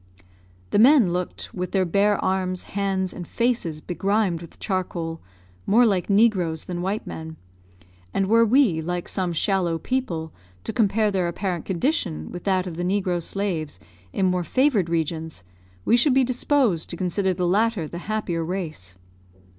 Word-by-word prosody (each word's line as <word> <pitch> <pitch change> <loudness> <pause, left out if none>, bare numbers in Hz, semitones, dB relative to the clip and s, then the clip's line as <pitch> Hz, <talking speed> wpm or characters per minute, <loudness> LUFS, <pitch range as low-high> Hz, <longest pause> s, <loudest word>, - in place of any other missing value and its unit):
The - - +3
men 240 - +6
looked, 180 0 -4
with 180 -1 -4
their 190 -2 +2
bare 200 +4 +2
arms, 185 -1 -1
hands, 190 -2 -2
and 175 -3 -7
faces 230 -11 -1
begrimed 195 -1 0
with 170 - -12
charcoal, 175 -4 -3 0.5
more 235 +5 +5
like 195 -4 +1
negroes 195 -7 +2
than 175 -1 -4
white 195 +4 -2
men; 160 0 -7 0.8
and 195 - +1
were 230 +4 +5
we, 225 - +3
like 175 +2 -3
some 185 -3 -2
shallow 175 0 +1
people, 165 -6 -3 0.3
to - - -4
compare 215 -2 +2
their 185 -3 0
apparent 175 -1 -3
condition 175 - -1
with 175 - -8
that 190 -2 +1
of 170 -3 -6
the 175 - -2
negro 185 -2 0
slaves 165 - -3 0.3
in 190 - 0
more 180 -1 +1
favoured 230 - +2
regions, 160 - -2 0.4
we - - +5
should 255 +2 +4
be 265 - +5
disposed 250 - +1
to 170 - -6
consider 190 +2 0
the 180 0 -1
latter 205 -2 +1
the 170 - -7
happier 190 -6 -1
race. 155 - -5
185 Hz, 160 wpm, -24 LUFS, 170-210 Hz, 0.8 s, men